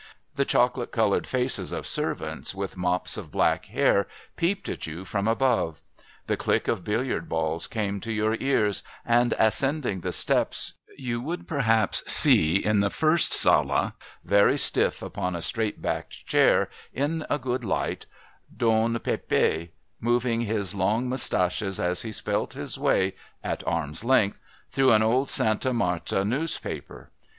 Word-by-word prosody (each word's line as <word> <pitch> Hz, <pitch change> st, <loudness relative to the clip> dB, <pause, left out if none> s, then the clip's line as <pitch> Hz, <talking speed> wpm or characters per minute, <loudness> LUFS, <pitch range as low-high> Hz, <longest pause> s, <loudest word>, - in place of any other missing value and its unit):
The 140 Hz, -, 0 dB
chocolate 125 Hz, -1 st, +1 dB
coloured 110 Hz, -4 st, +1 dB
faces 130 Hz, 0 st, 0 dB
of -, -, -4 dB
servants -, -, -3 dB
with 100 Hz, 0 st, -5 dB
mops 90 Hz, 0 st, 0 dB
of -, -, -7 dB
black -, -, +1 dB
hair 100 Hz, -, +2 dB, 0.3 s
peeped 185 Hz, +4 st, -1 dB
at -, -, -4 dB
you 85 Hz, +4 st, -7 dB
from 100 Hz, +2 st, -2 dB
above; 115 Hz, -8 st, 0 dB, 0.4 s
the -, -, 0 dB
click -, -, -1 dB
of 105 Hz, -6 st, -1 dB
billiard 110 Hz, -4 st, -2 dB
balls 80 Hz, 0 st, -1 dB
came 100 Hz, -3 st, -3 dB
to 115 Hz, -, -5 dB
your 110 Hz, 0 st, 0 dB
ears, 110 Hz, -7 st, +1 dB, 0.2 s
and, 120 Hz, 0 st, +2 dB
ascending 120 Hz, -, +3 dB
the -, -, -3 dB
steps, -, -, +2 dB, 0.2 s
you 120 Hz, -3 st, -3 dB
would 165 Hz, +7 st, -5 dB
perhaps 115 Hz, -8 st, +1 dB
see 80 Hz, +2 st, +3 dB
in 105 Hz, +1 st, +2 dB
the 100 Hz, 0 st, +2 dB
first 160 Hz, +8 st, +1 dB
sala, -, -, +2 dB, 0.3 s
very 100 Hz, 0 st, +3 dB
stiff -, -, +2 dB
upon 90 Hz, 0 st, -4 dB
a -, -, -3 dB
straight 110 Hz, -2 st, -1 dB
backed -, -, -4 dB
chair, -, -, +3 dB, 0.2 s
in 155 Hz, +4 st, -2 dB
a 145 Hz, -, +1 dB
good 125 Hz, -1 st, -3 dB
light, 100 Hz, -, -2 dB, 0.5 s
Don 115 Hz, 0 st, +2 dB
Pépé 85 Hz, -6 st, -1 dB, 0.3 s
moving 120 Hz, 0 st, 0 dB
his 105 Hz, -4 st, 0 dB
long 105 Hz, +5 st, 0 dB
moustaches 95 Hz, -6 st, +1 dB
as 90 Hz, +1 st, +1 dB
he 110 Hz, -, -4 dB
spelt -, -, -2 dB
his -, -, -3 dB
way, 95 Hz, 0 st, +1 dB, 0.3 s
at -, -, -3 dB
arm's 80 Hz, +2 st, -1 dB
length, 115 Hz, -5 st, +2 dB, 0.3 s
through 135 Hz, -3 st, +4 dB
an 110 Hz, 0 st, +4 dB
old 125 Hz, +5 st, +1 dB
Sta 110 Hz, +4 st, +2 dB
Marta 95 Hz, -4 st, 0 dB
newspaper. 140 Hz, +10 st, -2 dB
110 Hz, 150 wpm, -25 LUFS, 95-125 Hz, 0.5 s, through